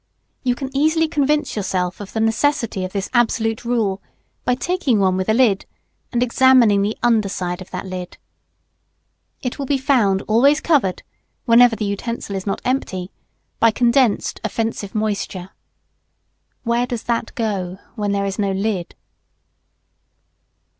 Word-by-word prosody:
You 250 -2 +1
can 270 +1 -6
easily 315 +3 +3
convince 300 -1 0
yourself 185 -2 -2
of 200 - -9
the 220 - -1
necessity 225 -2 +1
of 185 - -4
this 195 -1 -2
absolute 225 -2 +1
rule, 220 -5 0 0.4
by 250 - +2
taking 310 -5 0
one 190 -1 +2
with 190 +2 -2
a - - +4
lid, 225 -6 +3 0.4
and 240 0 +1
examining 245 -4 +5
the 210 +2 -1
under 225 -4 +3
side 180 -1 -3
of 185 - -10
that 180 +1 -5
lid. 185 -1 -6 1.3
It 250 +2 -4
will 275 - -3
be 280 - +2
found 235 -8 +2
always 275 +7 +4
covered, 280 - +1 0.4
whenever 235 -1 +6
the 215 - -3
utensil 200 +1 -4
is 190 +1 -5
not 195 - -2
empty, 195 -8 -2 0.5
by 230 - +6
condensed 240 0 +2
offensive 225 -3 -3
moisture. 200 -3 -2 1.1
Where 235 +1 +1
does 240 -3 -4
that 235 0 -2
go, 195 -5 -2 0.2
when 205 -1 -2
there 200 0 0
is 195 +1 -4
no 200 -1 +1
lid? 195 -3 -2
225 Hz, 145 wpm, -20 LUFS, 195-250 Hz, 1.3 s, whenever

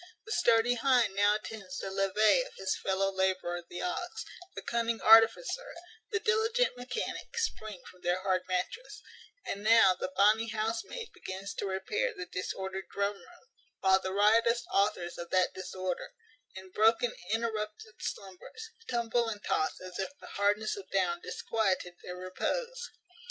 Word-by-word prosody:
The 435 - -8
sturdy 240 - +4
hind 245 -4 +3
now 205 +1 +4
attends 210 -4 -6
the 195 - -4
levee 195 - +3
of - - -8
his 190 0 -1
fellow 195 0 0
labourer 185 -2 0
the 175 - -5
ox; 265 - -3 0.3
the - - -6
cunning 230 -1 0
artificer, 225 - +5 0.3
the 425 - 0
diligent 450 - +2
mechanic, 250 - -5
spring 215 - -3
from 180 - -14
their 175 +1 +1
hard 185 -2 +2
mattress; 185 - -3 0.4
and 200 - -4
now 225 -3 +7
the 180 - -4
bonny 215 +3 +5
housemaid 225 - -3
begins 195 +1 -6
to 200 - -3
repair 425 - -1
the 395 -3 -5
disordered 190 - -4
drum 200 0 0
room, 350 - -18 0.3
while 190 0 +5
the 190 0 -4
riotous 230 +4 +4
authors 180 -3 +1
of 170 0 -6
that 185 -1 +2
disorder, 185 -1 -4 0.4
in 190 0 -10
broken 225 +4 +3 0.2
interrupted 215 -1 -2
slumbers, 200 - -7 0.2
tumble 235 -1 +1
and 210 -2 -6
toss, 155 - 0
as 185 -1 -8
if 240 +9 -4
the - - -11
hardness 205 +2 +1
of 195 -2 -10
down 175 -3 +1
disquieted 195 -5 -1
their 180 0 -7
repose. 480 - -3
210 Hz, 150 wpm, -31 LUFS, 190-235 Hz, 0.4 s, now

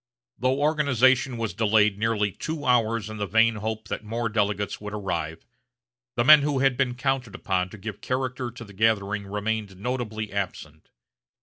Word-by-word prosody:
Though 130 +2 +1
organization 135 -4 +3
was 115 -2 -2
delayed 105 -2 +3
nearly 105 -2 +1
two 155 - -5
hours 115 -3 +2
in 110 0 -7
the 100 -1 -2
vain 115 +2 +3
hope 110 0 -4
that - - -4
more 115 +2 -2
delegates 105 -2 -1
would 105 0 -5
arrive, 85 -5 -4 0.7
the 120 - +2
men 150 +3 +9
who 145 -1 0
had 135 -1 +3
been 125 -1 0
counted 130 -3 -1
upon 95 -3 -1
to 110 - -11
give 105 +1 -7
character 125 -1 -2
to 120 0 -10
the 100 - -14
gathering 100 -1 +1
remained 105 -1 -3
notably 110 -2 -4
absent. 85 -6 -5
110 Hz, 170 wpm, -25 LUFS, 105-125 Hz, 0.7 s, men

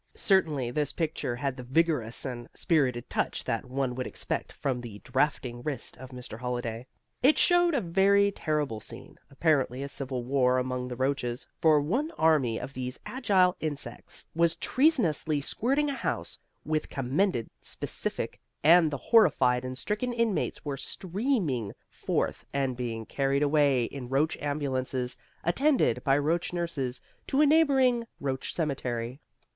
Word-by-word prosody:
Certainly 155 - +2
this 150 +2 -1
picture 155 -7 -2
had 135 +1 -2
the - - -6
vigorous 130 -3 +1
and 120 -3 -5
spirited 130 -7 +1
touch - - -1
that 115 +3 -2
one 130 0 -2
would 130 0 -3
expect - - -2
from 130 -3 -2
the 115 -4 -8
draughting 130 -2 -1
wrist 135 -2 -2
of 130 0 -10
Mr. 125 -3 -7
Holliday. 120 -1 -4 0.3
It 275 +4 +5
showed 350 -2 +4
a 260 - +2
very 200 +3 +3
terrible 150 - -1
scene, - - -10
apparently 135 -3 +1
a - - -3
civil 130 -2 -3
war 130 0 +2
among 125 0 -2
the 125 - -5
roaches, 130 -2 -1 0.2
for 155 -2 +6
one 235 - 0
army 145 -8 +3
of 135 - -7
these 125 -1 -5
agile 195 -8 +2
insects 150 -3 -4
was 170 0 +2
treasonously 180 - +2
squirting 275 - 0
a - - -2
house 270 - -3 0.3
with 155 0 +1
the - - -15
commended 135 - 0
specific, - - -3 0.2
and 165 +1 +7
the 140 - -3
horrified 130 - +4
and 130 0 -5
stricken 215 - -2
inmates 230 -8 -1
were 140 -2 -3
streaming 175 - -1 0.2
forth - - -2
and 135 -2 0
being 115 -2 -4
carried 140 +3 0
away 145 -4 +3
in 125 +1 -6
roach 140 +4 +1
ambulances, 130 -3 -2 0.3
attended 270 - +2
by 135 -1 +3
roach 165 +5 0
nurses, 145 -8 -2 0.3
to 275 - +1
a - - +7
neighbouring 270 -6 +4
roach 135 -2 -3
cemetery. 130 -5 -2
140 Hz, 150 wpm, -28 LUFS, 125-175 Hz, 0.3 s, and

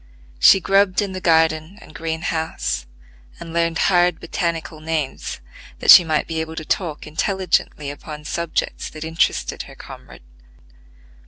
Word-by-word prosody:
She 125 - +7
grubbed 195 0 +2
in 205 -2 -1
the 185 0 -6
garden 160 +2 +2
and 155 - -15
green 160 +2 -4
house, 160 - -2 0.5
and 165 -1 -9
learned 165 -1 0
hard 175 -2 +3
botanical 165 -2 -3
names 155 -3 -3 0.4
that - - +6
she 180 - +11
might 155 -2 0
be 160 -1 -3
able 160 0 -6
to 160 - -6
talk 165 -4 -2
intelligently 170 -4 -1
upon 150 +1 -10
subjects 170 +1 -3
that 155 - -8
interested 160 +1 -1
her - - -13
comrade. - - -12
160 Hz, 145 wpm, -21 LUFS, 155-175 Hz, 0.5 s, she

